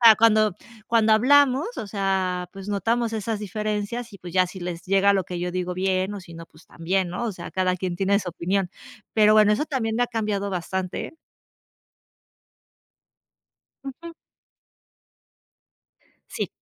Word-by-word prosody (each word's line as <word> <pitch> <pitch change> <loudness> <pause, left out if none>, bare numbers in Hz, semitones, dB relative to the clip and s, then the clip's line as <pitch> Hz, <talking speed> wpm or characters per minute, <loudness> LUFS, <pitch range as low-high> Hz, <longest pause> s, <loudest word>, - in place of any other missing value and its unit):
ah, 230 -2 +9
cuando 215 -3 +4 0.3
cuando 225 -1 +3
hablamos, 280 - +4
o 210 - -4
sea, 190 -3 -1
pues, 195 +1 -9
notamos 225 +3 0
esas 220 0 -2
diferencias. 215 +3 -3
Y, 200 - -11
pues, 175 -1 -9
ya 185 -1 +3
si 185 +1 -10
les 175 -1 -5
llega 195 +1 +4
lo 190 -3 +1
que 180 -1 -5
yo 180 0 -2
digo, 180 0 -3
bien, 190 +1 0
o 200 - -6
si 170 -2 -13
no, 165 0 -9
pues, 155 - -21
también, 180 +2 -1
¿no? 180 +7 -4
O 220 - -2
sea, 175 -1 -8
cada 185 -1 +1
quien 180 -1 -3
tiene 200 +1 +2
su 185 - -5
opinión. 180 +2 -1 0.4
Pero 215 -1 +5
bueno, 210 -1 +6
eso 220 +8 +1
también 230 -7 -2
me 245 - +3
ha - - -6
cambiado 210 -4 -2
bastante. 185 - -4 2.7
Ujú. 330 +5 -8 2.2
Sí. - - -3
200 Hz, 160 wpm, -24 LUFS, 185-220 Hz, 2.7 s, ah